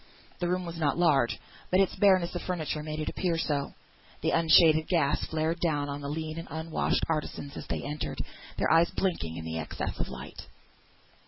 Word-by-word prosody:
The 175 - 0
room 180 +1 0
was 170 -1 -6
not 150 -1 +1
large, 145 -8 +3 0.3
but 185 - +3
its 195 - +2
bareness 185 -4 +4
of 175 - -3
furniture 160 -4 -2
made 155 0 -5
it 155 - -3
appear 175 -3 -1
so. 145 -3 -1 0.5
Unshaded 160 -1 +5
gas 150 -5 +2
flared 160 +2 -1
down 150 -4 0
upon 140 0 -4
the 140 - -4
lean 155 +1 -4
and 165 - -7
unwashed 160 +2 0
artisans 150 -2 -3
as - - -7
they - - -3
entered, 150 +1 -4 0.4
their - - +1
eyes 165 +1 +5
blinking 85 - -2
at 80 - -5
the 80 0 -3
excess 80 - -4
of - - -2
light. - - -9
160 Hz, 185 wpm, -29 LUFS, 145-170 Hz, 0.5 s, Unshaded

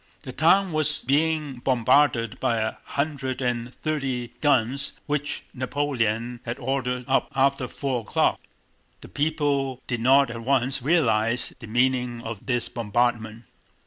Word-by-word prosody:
The 130 - -6
town 185 +7 +3
was 155 -1 +2
being 150 0 +1
bombarded 120 -1 +2
by 115 - +1
a 110 0 -1
hundred 140 -3 -2
and 125 -1 -2
thirty 135 -5 -3
guns 140 -1 +1
which 150 0 -2
Napoleon 125 -3 -1
had 120 +2 -4
ordered 125 -1 -2
up 135 - +1
after 135 -1 +2
four 130 -2 -3
o'clock. 105 - +1 0.6
The - - -12
people 145 -3 0
did 120 -3 -3
not 135 +1 +5
at 115 -1 -6
once 130 +1 +1
realize 120 -6 +1
the 115 - -9
meaning 125 0 0
of 115 -1 -7
this 120 -2 0
bombardment. 115 0 -1
130 Hz, 135 wpm, -25 LUFS, 120-140 Hz, 0.6 s, not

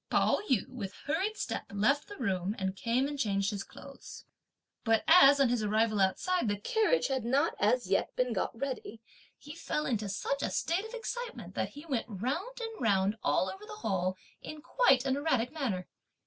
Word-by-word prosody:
Pao - - +3
yü 250 -7 +2
with 210 -7 -7
hurried 375 +9 -1
step - - -3
left 225 +9 +1
the 410 - -9
room 195 -4 -1
and 190 0 -2
came 240 +6 0
and 290 -1 -5
changed 200 -3 +1
his 200 -1 -4
clothes. - - -12 0.6
But 225 -1 +2
as 285 -5 +8
on 275 -3 +4
his 240 -2 +1
arrival 215 0 +2
outside, 350 - +1
the 205 0 0
carriage 445 - +1
had 265 -3 -1
not 275 +7 +2
as 240 +4 +2
yet 195 +1 0
been 250 -1 0
got 225 +3 -2
ready, 255 -4 -4 0.4
he 295 - -10
fell 305 -2 -3
into 215 -5 -1
such 275 +8 -2
a - - 0
state 355 +6 -1
of 445 +2 -7
excitement, 485 +1 -5
that - - -2
he 290 +3 -11
went 265 -8 -2
round 265 - -3
and 450 - -6
round 200 -2 +2
all - - +2
over 385 - -7
the 425 0 -8
hall 185 -2 0 0.2
in 305 -1 -9
quite 275 - +3
an 265 -1 +1
erratic 260 -5 0
manner. 235 - -3
255 Hz, 190 wpm, -31 LUFS, 205-310 Hz, 0.6 s, as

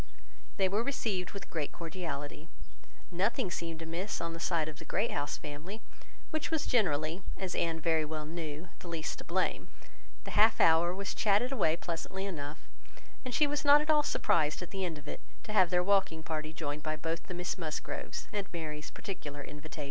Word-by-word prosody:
They 190 - +4
were 200 +4 +2
received 215 -9 -1
with 200 -1 -8
great 155 -4 -1
cordiality. 160 -3 -5 0.6
Nothing 195 +3 +1
seemed 165 -1 -3
amiss 170 +5 -2
on 165 0 -2
the 165 - -6
side 165 -2 +1
of 155 -1 -6
the - - -7
Great 215 +4 +1
House 145 -1 -1
family, 155 +8 -6 0.5
which 315 -1 -1
was 320 -2 +1
generally, 165 -6 +2 0.2
as 185 -2 -2
Anne 165 -1 +1
very 160 0 +3
well 155 0 -3
knew, 160 +1 -5
the - - -9
least 165 -2 -3
to - - -7
blame. - - 0 0.6
The - - -6
half 215 +1 +6
hour 165 +2 +6
was 195 +2 -3
chatted 215 +5 +3
away 180 -12 +3
pleasantly 175 +4 -3
enough; 155 -5 -5 0.6
and 255 - -4
she 300 - +5
was 295 +1 0
not 290 0 +9
at 305 +1 +2
all 300 -1 +6
surprised, 165 - +2
at 180 - -8
the 195 -1 -2
end 170 -4 -2
of 145 0 -12
it, - - -5 0.2
to 215 - -5
have 185 -5 +6
their 180 0 +3
walking 190 -5 +3
party 155 -1 -2
joined 150 -2 -3
by 155 0 -1
both 165 +2 -3
the 180 - -4
Miss 180 +1 -2
Musgroves, 155 -3 -4
at 200 -2 -2
Mary's 155 -3 -4
particular 145 -7 -6
invitation. 150 +2 -8
170 Hz, 195 wpm, -33 LUFS, 155-200 Hz, 0.6 s, not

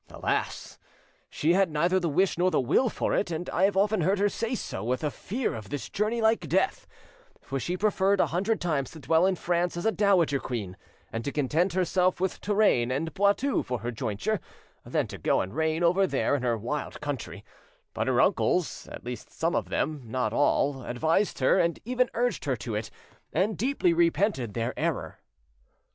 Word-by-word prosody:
Alas! - - -3 0.5
she 160 +3 +1
had 190 -1 +3
neither 170 +5 +2
the 170 -2 -1
wish 185 +6 +2
nor 180 +2 +2
the - - +1
will 185 - +2
for - - -2
it, 200 - +1
and 170 +1 -4
I 185 - +3
have 195 -1 +1
often 205 0 +2
heard 190 +5 +2
her 205 +1 +2
say 230 +4 -2
so, 95 - -5
with 125 +5 -1
a 150 - 0
fear 235 +6 -3
of 110 -2 -8
this 145 -4 -5
journey 220 +3 -1
like 220 +1 +2
death; - - +1 0.6
for 135 - -3
she 175 +7 -2
preferred 200 -1 +2
a - - +5
hundred 200 +6 0
times 150 -6 -1
to 160 - -11
dwell 160 +6 +3
in 190 - +1
France 175 0 -1
as 175 - -4
a 225 - +4
dowager 190 -9 +3
queen, 105 -9 -4 0.4
and 115 0 -3
to 140 - -2
content 155 +6 +1
herself 185 0 +1
with 190 0 -2
Touraine 205 - +2
and 150 +5 -2
Poitou 205 +8 +2
for 125 -3 -4
her 120 +1 -3
jointure, 115 - -2 0.4
than - - -1
to - - -9
go - - +2
and 95 - -3
reign 160 +1 0
over 185 +3 +4
there 140 -2 0
in 140 - -2
her 120 -2 0
wild 125 +8 -4
country; 145 -3 -5 0.5
but - - -2
her - - +2
uncles, - - +1
at - - -9
least 125 0 -7
some 165 +1 -1
of - - -1
them, 155 -2 -1
not 125 +3 -2
all, 145 -1 +2
advised 160 +12 0
her, 130 - +3
and 170 -1 +1
even 250 +1 +1
urged 245 -5 0
her 135 -3 +1
to 120 -2 -6
it, 105 +1 -3 0.4
and 195 +6 +1
deeply 230 -5 +1
repented 165 - +1
their 115 +2 -1
error." - - -2
170 Hz, 200 wpm, -27 LUFS, 135-195 Hz, 0.6 s, a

